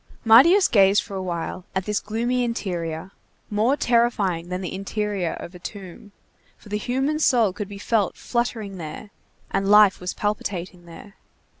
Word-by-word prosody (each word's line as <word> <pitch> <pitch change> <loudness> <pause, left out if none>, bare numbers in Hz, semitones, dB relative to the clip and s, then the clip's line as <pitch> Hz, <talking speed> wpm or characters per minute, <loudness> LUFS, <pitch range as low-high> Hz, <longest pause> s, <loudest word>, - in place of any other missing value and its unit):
Marius 335 - +7
gazed 200 -1 +4
for - - -11
a 190 - -3
while 175 0 -4
at 190 -1 -1
this 210 -1 0
gloomy 240 +4 -1
interior, 180 -7 -4 0.4
more 225 +7 +2
terrifying 210 - +1
than 180 +1 -3
the 180 - -5
interior 195 -2 -2
of 170 - -9
a 180 - -11
tomb, 195 +1 -10 0.5
for - - -16
the 210 - -1
human 270 +7 -1
soul 235 -10 +3
could 205 0 -5
be 200 - -8
felt 205 -1 0
fluttering 225 -5 -3
there, 165 +6 -8 0.4
and 195 0 0
life 210 -2 +6
was 180 - -4
palpitating 185 -4 -4
there. 195 +4 -13
205 Hz, 160 wpm, -23 LUFS, 185-230 Hz, 0.5 s, Marius